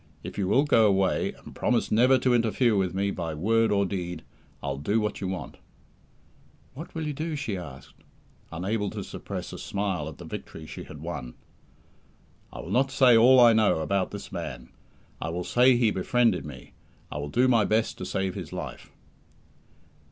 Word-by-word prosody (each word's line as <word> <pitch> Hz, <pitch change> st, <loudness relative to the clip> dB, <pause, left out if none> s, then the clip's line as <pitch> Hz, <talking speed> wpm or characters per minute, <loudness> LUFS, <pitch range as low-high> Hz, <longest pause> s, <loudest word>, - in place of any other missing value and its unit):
"If -, -, -7 dB
you 95 Hz, -2 st, -1 dB
will 135 Hz, +8 st, +4 dB
go 115 Hz, -7 st, +4 dB
away, 95 Hz, -2 st, +1 dB
and -, -, -14 dB
promise 120 Hz, -2 st, 0 dB
never 125 Hz, +4 st, +5 dB
to 125 Hz, 0 st, +2 dB
interfere 115 Hz, 0 st, +2 dB
with 95 Hz, -2 st, 0 dB
me 100 Hz, +1 st, 0 dB
by 85 Hz, -4 st, -4 dB
word 115 Hz, +7 st, +2 dB
or 100 Hz, -1 st, +2 dB
deed, 90 Hz, -4 st, -4 dB, 0.4 s
I'll 70 Hz, -1 st, -3 dB
do 100 Hz, +10 st, +1 dB
what 105 Hz, -1 st, -3 dB
you 95 Hz, -, -2 dB
want." 95 Hz, -1 st, -5 dB, 1.2 s
"What 155 Hz, +7 st, -10 dB
will 160 Hz, -1 st, -3 dB
you 150 Hz, -, -2 dB
do?" 155 Hz, +2 st, -3 dB
she 140 Hz, -9 st, -3 dB
asked, 70 Hz, -7 st, -10 dB, 0.5 s
unable 100 Hz, +5 st, -2 dB
to -, -, -6 dB
suppress -, -, -7 dB
a -, -, -7 dB
smile 95 Hz, -6 st, -2 dB
at 80 Hz, -, -11 dB
the -, -, -10 dB
victory 80 Hz, -, -8 dB
she -, -, -8 dB
had 75 Hz, -1 st, -11 dB
won. 75 Hz, -7 st, -6 dB, 1.2 s
"I -, -, -7 dB
will -, -, -8 dB
not 135 Hz, +2 st, +2 dB
say 130 Hz, -3 st, +5 dB
all 125 Hz, +3 st, +7 dB
I 120 Hz, -2 st, +8 dB
know 110 Hz, -5 st, +3 dB
about 95 Hz, +4 st, 0 dB
this -, -, -8 dB
man. 60 Hz, 0 st, -6 dB, 0.5 s
I -, -, -2 dB
will 90 Hz, +2 st, -3 dB
say 125 Hz, +6 st, +4 dB
he 115 Hz, -3 st, +3 dB
befriended 115 Hz, -1 st, +1 dB
me. 70 Hz, -3 st, -11 dB, 0.4 s
I 75 Hz, -, -4 dB
will 75 Hz, 0 st, -4 dB
do 125 Hz, -, +3 dB
my 115 Hz, -4 st, +4 dB
best 110 Hz, +2 st, 0 dB
to -, -, -5 dB
save 95 Hz, 0 st, -1 dB
his 90 Hz, -7 st, -7 dB
life." -, -, -7 dB
100 Hz, 190 wpm, -27 LUFS, 85-120 Hz, 1.2 s, I